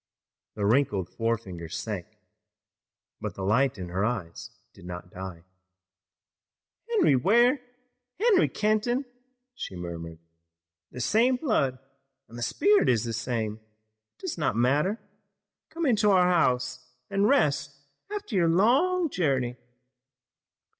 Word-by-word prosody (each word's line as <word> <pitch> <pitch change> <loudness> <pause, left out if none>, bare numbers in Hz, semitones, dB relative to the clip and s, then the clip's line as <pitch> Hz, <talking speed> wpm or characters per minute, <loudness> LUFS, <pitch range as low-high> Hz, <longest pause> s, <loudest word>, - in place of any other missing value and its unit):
The 105 -2 -2
wrinkled 105 -6 +2
forefinger 110 -8 -3
sank, 95 +1 -4 1.1
but - - -5
the 95 - -6
light 120 +7 +2
in 90 -2 -6
her 95 +3 -1
eyes 105 -8 -3 0.2
did - - -16
not 90 0 -8
die. 90 -3 -8 1.5
"Henry 420 - +4
Ware, 240 - +4 0.6
Harry 410 -2 +4
Kenton!" 215 +5 0 0.5
she 165 - -7
murmured. 85 -2 -7 0.7
"The 125 - -6
same 235 - +3
blood, 185 - 0 0.5
and 115 - -14
the 120 - -7
spirit 400 - +3
is 115 -4 +2
the 115 -1 -3
same. 110 -2 -2 0.6
It - - -26
does 365 - -4
not 150 -8 0
matter. 145 - +2 0.7
Come 335 0 -3
into 215 -5 +3
our 185 -2 +5
house 125 -6 +1 0.3
and 200 +2 +2
rest 145 - +1 0.3
after 415 - -6
your 170 -3 +3
long 280 - +3
journey." 135 - 0
135 Hz, 120 wpm, -27 LUFS, -, 1.5 s, our